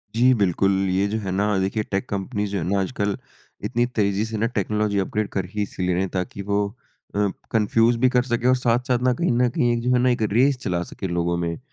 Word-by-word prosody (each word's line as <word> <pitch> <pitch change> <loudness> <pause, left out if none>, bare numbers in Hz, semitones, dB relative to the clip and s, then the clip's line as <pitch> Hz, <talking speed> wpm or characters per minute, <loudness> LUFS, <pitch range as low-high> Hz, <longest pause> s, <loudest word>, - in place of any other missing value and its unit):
जी, 125 +3 +5
बिल्कुल 100 -3 +2 0.2
ये 95 +2 +2
जो 105 +2 -2
है 95 -3 -4
ना 100 +1 +1
देखिए 100 +3 -1
टेक 95 -1 -3
कंपनीज़ 105 +1 -3
जो 100 - -1
हैं 85 - -2
ना, 100 0 +2
आजकल 100 0 -1 0.5
इतनी 120 -1 +1
तेज़ी 100 0 +1
से 110 -1 -4
ना 110 - +1
टेक्नोलॉजी 105 0 0
अपग्रेड 105 +2 -1
कर 95 -2 0
ही 105 - -1
इसलिए 90 -2 -2
रहे 90 - +1
हैं 95 - -1
ताकि 95 +1 -3
वो 100 0 +2 0.5
अ, 105 0 +2 0.2
कन्फ्यूज़ 115 +2 +3
भी 130 +1 +4
कर 125 -1 +2
सकें 120 0 -1
और 130 - +5
साथ-साथ 125 0 +1
ना 130 0 +3
कहीं 170 +2 0
न 125 +1 +3
कहीं 120 0 +1
एक 120 - 0
जो 125 - 0
है 125 - +4
ना 125 +1 +3
एक 120 -2 0
रेस 130 +5 +3
चला 90 -1 -1
सके 95 - -5
लोगों 85 0 0
में। 85 -1 -1
अ, - - -13
105 Hz, 245 wpm, -23 LUFS, 95-120 Hz, 0.5 s, जी